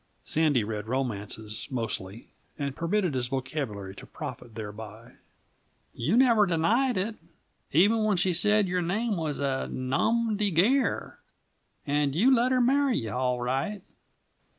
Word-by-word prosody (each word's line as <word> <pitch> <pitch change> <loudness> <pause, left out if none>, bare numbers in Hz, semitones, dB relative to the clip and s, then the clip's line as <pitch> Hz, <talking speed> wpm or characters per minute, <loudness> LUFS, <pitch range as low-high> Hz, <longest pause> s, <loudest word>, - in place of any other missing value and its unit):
(Sandy 150 -7 +2
read 105 0 -4
romances, 110 -4 -3
mostly, 115 -4 -4 0.3
and 140 -2 -3
permitted 180 0 0
his 125 -2 -1
vocabulary 125 -7 -4
to - - -11
profit 115 -3 -8
thereby.) 110 +2 -9 0.8
"You 165 - 0
never 235 -5 +5
denied 225 +10 +2
it, 215 +4 -2 0.5
even 210 +8 +4
when 210 -3 +2
she 185 0 +2
said 210 +3 +3
your 180 0 0
name 205 +6 -1
was 160 -4 -2
a 135 -2 -1
nomdy 210 - 0
gair; 235 - +1 0.7
and 145 -1 0
you 245 +10 +5
let 250 +1 +3
her 255 - +3
marry 270 +1 +3
you, 110 -2 -3
all 125 -1 -1
right." 135 +11 -2
155 Hz, 135 wpm, -27 LUFS, -, 0.8 s, never